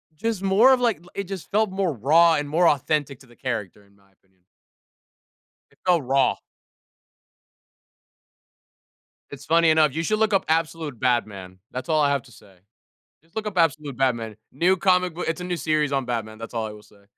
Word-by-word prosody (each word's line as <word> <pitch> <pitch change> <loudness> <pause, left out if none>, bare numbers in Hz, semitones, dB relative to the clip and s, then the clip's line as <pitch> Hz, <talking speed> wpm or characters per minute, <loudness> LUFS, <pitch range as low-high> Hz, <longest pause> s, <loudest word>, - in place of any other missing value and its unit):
just 220 +2 -3
more 200 +7 +5
of, 255 - +2
like 235 -7 +1
l 180 - -17
it 200 - -4
just 190 -2 -8
felt 215 +1 +2
more 190 -3 -1
raw 160 +8 +4
and 145 0 -3
more 170 +3 +3
authentic 145 -2 0
to 135 - -18
the 120 - -20
character, 105 -6 -5
in 100 - -27
my 100 -1 -29
opinion. 95 -1 -39 1.3
It - - -29
felt 175 -5 +3
raw. 135 0 +2 2.9
It's 140 -1 -10
funny 165 +1 +4
enough. 155 -3 +3
You 165 - -1
should 215 +5 0
look 220 -1 +2
up 195 - +2
Absolute 160 -5 -2
Batman. 100 -7 -2
That's 130 0 -6
all 155 -1 +2
I 145 - +2
have 140 -2 0
to 125 - -18
say. 95 -2 -19 0.7
Just 165 +5 -32
look 215 -1 -3
up 190 - -6
Absolute 150 -5 0
Batman. 115 -5 -1 0.2
New 175 +7 +2
comic 180 -1 +2
book. 175 - -4
It's 165 +2 -2
a - - -5
new 180 -1 -3
series 155 -3 0
on 135 -2 -1
Batman. 110 -3 -4
That's 115 +1 -9
all 115 -1 -2
I - - -7
will 105 0 -13
say. 100 -1 -23
150 Hz, 195 wpm, -23 LUFS, 120-180 Hz, 2.9 s, more